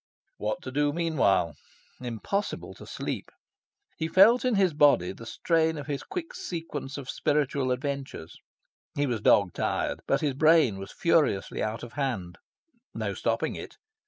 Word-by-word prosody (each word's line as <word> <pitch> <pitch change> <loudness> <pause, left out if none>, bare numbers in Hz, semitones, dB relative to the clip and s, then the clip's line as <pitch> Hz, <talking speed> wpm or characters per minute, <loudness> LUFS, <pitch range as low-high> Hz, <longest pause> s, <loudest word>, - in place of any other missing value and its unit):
What 105 0 -3
to 130 - -6
do 145 +2 +2
meanwhile? 145 - +2 0.5
Impossible 125 - -3
to - - -13
sleep. - - -4 0.7
He 160 - -1
felt 210 +8 +6
in 250 -3 +2
his 190 -4 +3
body 145 -12 +4
the 115 +4 -10
strain 160 +4 +1
of 145 - -6
his 145 -2 -3
quick 360 -4 -6
sequence 150 -5 -5
of 140 -3 -7
spiritual 140 -3 0
adventures. 135 - -4 0.6
He 145 - +1
was 120 -6 -2
dog 100 -4 +4
tired. - - -1
But - - +2
his 145 -3 +1
brain 155 -8 +4
was 95 - -8
furiously 155 - +1
out 110 +1 -2
of 120 -1 -9
hand: 120 -12 -3 0.6
no - - -2
stopping - - -1
it. - - -9
140 Hz, 155 wpm, -28 LUFS, 115-160 Hz, 0.7 s, felt